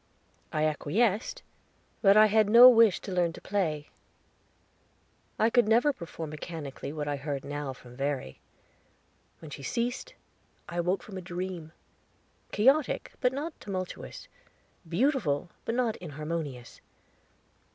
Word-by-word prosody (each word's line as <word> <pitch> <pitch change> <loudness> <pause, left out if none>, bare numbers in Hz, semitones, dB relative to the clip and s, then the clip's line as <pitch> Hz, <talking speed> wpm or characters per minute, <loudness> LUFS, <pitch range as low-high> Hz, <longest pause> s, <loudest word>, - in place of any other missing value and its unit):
I 155 - 0
acquiesced, 195 +9 0 0.6
but 200 -1 +6
I 215 - +9
had 215 -1 +3
no 235 +3 +10
wish 230 -5 +6
to 195 - -7
learn 175 -2 +1
to - - -10
play. 160 -7 -2 1.5
I 220 +2 +3
could 240 -3 +4
never 240 +7 +4
perform 165 - -7
mechanically 150 -3 -6
what 150 -1 -4
I 145 -1 -1
heard 140 -1 -4
now 145 -1 -4
from 125 -1 -15
Verry. 135 - -3 1.0
When 155 -2 -10
she 140 - -8
ceased, 245 - -3 0.5
I 175 - -4
woke 180 +3 0
from 195 -3 -9
a - - -8
dream, 180 -2 -5 0.8
chaotic, 270 +6 +2
but 250 - +3
not 300 +5 -5
tumultuous, 185 - -6 0.6
beautiful, 175 - +1
but 230 - -1 0.2
inharmonious. 150 -6 -6
180 Hz, 125 wpm, -29 LUFS, 150-225 Hz, 1.5 s, no